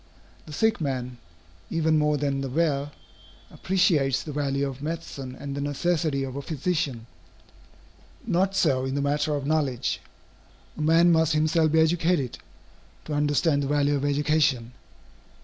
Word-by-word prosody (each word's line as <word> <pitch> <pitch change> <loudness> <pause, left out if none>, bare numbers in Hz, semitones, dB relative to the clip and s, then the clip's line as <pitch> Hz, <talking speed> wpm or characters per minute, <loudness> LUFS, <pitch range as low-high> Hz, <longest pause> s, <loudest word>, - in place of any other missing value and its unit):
The - - -9
sick 220 +6 +1
man, 125 -4 -3 0.5
even 160 -1 +1
more 150 0 +2
than 140 -1 -1
the 135 - -3
well, 145 -1 0 0.6
appreciates 160 -8 +1
the 155 - -6
value 140 -1 -1
of 135 0 -7
medicine 145 -5 -5
and 140 +1 -6
the 140 - -3
necessity 145 0 0
of 130 -1 -5
a 140 - -3
physician. 145 -5 -2 1.2
Not 190 +3 +1
so 135 -8 +2
in 130 +1 -2
the 140 - 0
matter 145 +1 0
of 140 -1 -3
knowledge. 130 - 0 0.7
A - - -6
man 165 +3 +5
must 160 -1 +3
himself 155 +1 +2
be 160 - +4
educated, 160 -4 +1 0.7
to 155 - -5
understand 145 +1 +2
the 140 - -2
value 145 0 +2
of 140 - -2
education. 145 -4 +1
145 Hz, 150 wpm, -25 LUFS, 135-160 Hz, 1.2 s, man